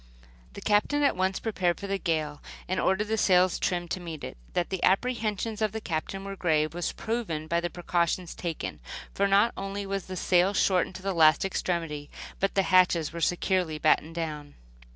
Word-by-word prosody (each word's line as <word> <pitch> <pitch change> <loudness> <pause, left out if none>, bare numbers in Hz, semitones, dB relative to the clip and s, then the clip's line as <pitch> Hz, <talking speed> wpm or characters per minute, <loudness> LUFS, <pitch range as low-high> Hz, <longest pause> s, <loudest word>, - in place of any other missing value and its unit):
The - - -9
Captain 215 +8 +2
at 280 - +3
once 185 +1 0
prepared 185 -6 0
for 200 - -6
a 195 0 -2
gale 155 -4 -2 0.3
and 185 -1 -1
ordered 190 +4 +1
the 220 0 0
sails 185 -2 +4
trimmed 175 -2 -1
to - - -1
meet 165 -4 -7
it. - - -6 0.2
That 175 -1 -1
the 190 - -2
apprehensions 220 0 0
of 215 -1 +1
the 220 - -3
Captain 195 +1 -4
were 195 0 -5
grave 155 -4 +1
was 175 0 -2
proven 215 -10 -3
by 170 +2 +1
the 175 0 -2
precautions 175 0 -1
taken; 160 - -5 0.3
for 200 - +2
not 200 +4 +4
only 195 +1 -4
was 195 -1 -3
sail 185 +1 +2
shortened 185 -1 +2
to 185 - -9
the 195 0 -1
last 160 +1 +5
extremity, 165 -6 -2 0.3
but 195 - 0
the 195 - +3
hatches 180 -4 +3
were 170 - -5
securely 175 -2 +1
battened 155 +1 +2
down. 150 -3 -5
185 Hz, 190 wpm, -28 LUFS, 165-195 Hz, 0.3 s, last